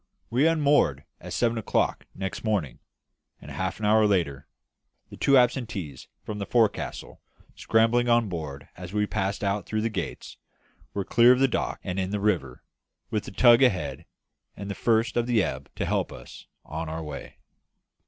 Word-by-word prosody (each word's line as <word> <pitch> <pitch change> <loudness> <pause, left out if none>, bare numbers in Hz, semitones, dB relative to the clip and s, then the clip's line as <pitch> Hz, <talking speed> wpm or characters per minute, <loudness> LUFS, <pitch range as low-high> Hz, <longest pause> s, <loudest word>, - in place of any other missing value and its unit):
We 130 +7 +3
unmoored 145 - +2 0.2
at - - -9
seven 115 -1 +1
o'clock 110 - -1
next 95 -1 -5
morning, 100 - -1 0.6
and - - -11
half 95 0 -3
an 110 - -2
hour 110 0 +5
later 80 -9 0 0.6
the - - -8
two 140 -1 +4
absentees 115 - 0 0.2
from 105 -1 -5
the 100 - -4
forecastle 115 -3 -1 0.3
scrambling 115 +2 +2
on 120 -1 +4
board 75 -6 -6
as 90 +1 -9
we 105 0 +1
passed 100 +1 -2
out 100 +1 -1
through 110 0 -1
the 115 +1 -1
gates - - -5 0.6
were 100 -1 -2
clear 120 +1 +6
of 125 - +4
the 135 - +5
dock 125 - -2
and 90 +1 -3
in 95 -1 -1
the 105 +1 -2
river, 90 -12 -1 0.5
with 105 -3 -1
the - - -8
tug 120 0 +6
ahead 125 -8 +1 0.5
and 100 0 -5
the - - -2
first 115 +3 +1
of 120 0 +1
the 115 -5 +3
ebb 65 -3 -4
to - - -2
help - - -1
us - - -12 0.2
on 80 +1 -5
our 80 +1 -5
way. 75 -2 -8
105 Hz, 175 wpm, -26 LUFS, 90-120 Hz, 0.6 s, clear